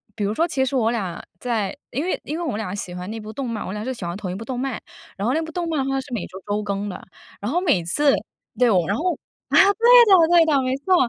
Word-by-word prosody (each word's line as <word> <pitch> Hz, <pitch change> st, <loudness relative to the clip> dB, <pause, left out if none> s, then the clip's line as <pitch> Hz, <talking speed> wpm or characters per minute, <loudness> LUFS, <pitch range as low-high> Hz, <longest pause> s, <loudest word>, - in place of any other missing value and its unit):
比 210 Hz, -, -3 dB
如 200 Hz, -, 0 dB
说 330 Hz, +9 st, +1 dB
其 265 Hz, -5 st, 0 dB
实 275 Hz, -, -2 dB
我 230 Hz, -3 st, +2 dB
俩 195 Hz, -8 st, -3 dB, 0.2 s
在 225 Hz, -6 st, -2 dB, 0.2 s
因 275 Hz, +5 st, -2 dB
为 370 Hz, -, -1 dB
因 305 Hz, +3 st, -4 dB
为 345 Hz, -, -3 dB
我 320 Hz, -, -2 dB
们 205 Hz, -, -2 dB
俩 205 Hz, -4 st, -4 dB
喜 185 Hz, -3 st, -5 dB
欢 180 Hz, +2 st, -6 dB
那 225 Hz, -, -5 dB
部 215 Hz, 0 st, -8 dB
动 260 Hz, 0 st, -4 dB
漫， 220 Hz, -2 st, -4 dB
我 190 Hz, -, -5 dB
俩 210 Hz, -, -4 dB
是 260 Hz, +3 st, -3 dB
喜 220 Hz, -7 st, -7 dB
欢 170 Hz, +1 st, -4 dB
同 190 Hz, -3 st, -5 dB
一 -, -, -4 dB
部 225 Hz, +3 st, -7 dB
动 250 Hz, -2 st, -4 dB
漫， 265 Hz, -3 st, -3 dB, 0.4 s
然 200 Hz, -, -2 dB
后 250 Hz, -, +2 dB
那 320 Hz, -, +1 dB
部 320 Hz, 0 st, -6 dB
动 345 Hz, +1 st, -3 dB
漫 310 Hz, -4 st, 0 dB
的 270 Hz, -, -2 dB
话 270 Hz, -, 0 dB
是 270 Hz, -, -8 dB
每 210 Hz, -, -2 dB
周 190 Hz, +2 st, -11 dB
周 210 Hz, +1 st, -1 dB
更 200 Hz, 0 st, -3 dB
的。 185 Hz, -, -8 dB, 0.4 s
然 210 Hz, +5 st, -2 dB
后 350 Hz, -, +2 dB
每 285 Hz, -, +2 dB
次 275 Hz, -, +3 dB, 0.4 s
对， 250 Hz, -, +4 dB, 0.2 s
然 200 Hz, -, 0 dB
后， 355 Hz, +7 st, -1 dB, 0.3 s
啊， -, -, +3 dB
对 385 Hz, -, +8 dB, 0.4 s
的 360 Hz, -5 st, +6 dB
对 340 Hz, -2 st, +6 dB
的， 290 Hz, -4 st, +3 dB
没 255 Hz, 0 st, -1 dB
错， 365 Hz, +7 st, +2 dB
240 Hz, 320 characters per minute, -22 LUFS, 205-295 Hz, 0.4 s, 对